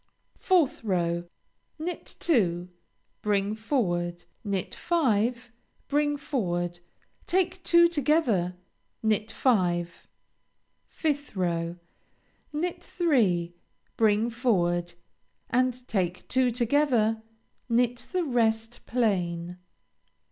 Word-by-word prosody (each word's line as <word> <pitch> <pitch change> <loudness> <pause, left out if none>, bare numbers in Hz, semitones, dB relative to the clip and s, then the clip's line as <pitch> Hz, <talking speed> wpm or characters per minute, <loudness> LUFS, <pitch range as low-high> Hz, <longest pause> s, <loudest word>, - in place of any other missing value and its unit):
4th 335 -5 +3
row 175 -4 0 0.5
Knit 340 +3 -5
two, 180 - +1 0.5
bring 205 0 +1
forward, 175 -7 -1 0.2
knit 200 -3 -2
five, 240 -7 0 0.4
bring 290 0 +1
forward, 175 - -2 0.5
take 365 0 0
two 340 0 +6
together, 285 - +1 0.5
knit 220 0 +1
five. 175 -10 0 0.8
5th 290 -6 -2
row 170 -2 -1 0.8
Knit 335 +4 -3
three, 200 - +1 0.4
bring 220 +1 +3
forward, 175 -8 +1 0.6
and 250 0 +1
take 180 -4 -2
two 260 -1 +3
together, 240 -2 +2 0.5
knit 240 +1 +1
the 365 -1 +1
rest 230 -4 0
plain. 180 -7 -1
225 Hz, 85 wpm, -27 LUFS, 180-280 Hz, 0.8 s, two